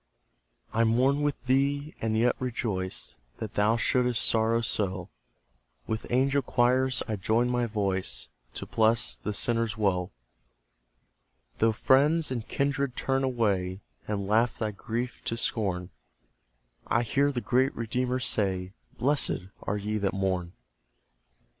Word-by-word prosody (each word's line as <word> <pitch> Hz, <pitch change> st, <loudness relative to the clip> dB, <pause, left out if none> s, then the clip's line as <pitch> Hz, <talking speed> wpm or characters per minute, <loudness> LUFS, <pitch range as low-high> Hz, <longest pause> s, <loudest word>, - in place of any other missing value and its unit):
I 115 Hz, -, +3 dB
mourn 130 Hz, +5 st, +3 dB
with 145 Hz, -3 st, -2 dB
thee, 140 Hz, +3 st, +1 dB
and 110 Hz, -1 st, 0 dB
yet 120 Hz, +2 st, +3 dB
rejoice 110 Hz, -7 st, -3 dB, 0.2 s
That 110 Hz, -1 st, -6 dB
thou 105 Hz, +3 st, +3 dB
shouldst 125 Hz, -1 st, +3 dB
sorrow 115 Hz, +1 st, +2 dB
so; 95 Hz, -5 st, -2 dB, 0.8 s
With 110 Hz, +1 st, -3 dB
angel 135 Hz, +3 st, +3 dB
choirs 130 Hz, 0 st, +2 dB
I 110 Hz, -, -2 dB
join 115 Hz, +5 st, +1 dB
my 120 Hz, -1 st, +1 dB
voice 95 Hz, -, -1 dB, 0.3 s
To -, -, -4 dB
bless 110 Hz, +1 st, +2 dB
the 105 Hz, -, -4 dB
sinner's 115 Hz, +1 st, 0 dB
woe. 90 Hz, -4 st, +1 dB, 1.5 s
Though 115 Hz, 0 st, +4 dB
friends 145 Hz, +7 st, +3 dB
and 120 Hz, -3 st, -3 dB
kindred 140 Hz, -2 st, -1 dB
turn 135 Hz, 0 st, 0 dB
away, 100 Hz, -7 st, 0 dB, 0.3 s
And 100 Hz, -2 st, -2 dB
laugh 110 Hz, +4 st, +2 dB
thy 110 Hz, -1 st, -1 dB
grief 115 Hz, +4 st, -4 dB
to 115 Hz, -, -2 dB
scorn; 95 Hz, -6 st, -2 dB, 1.0 s
I 120 Hz, -, +2 dB
hear 140 Hz, +5 st, +2 dB
the 130 Hz, -, -2 dB
great 130 Hz, +3 st, +1 dB
Redeemer 125 Hz, +3 st, -1 dB
say, 95 Hz, -6 st, -1 dB, 0.2 s
"Blessed 130 Hz, -9 st, +1 dB
are 105 Hz, -, -2 dB
ye 105 Hz, +1 st, -2 dB
that 100 Hz, -1 st, 0 dB
mourn." 95 Hz, -2 st, -1 dB
115 Hz, 130 wpm, -28 LUFS, 105-130 Hz, 1.5 s, Though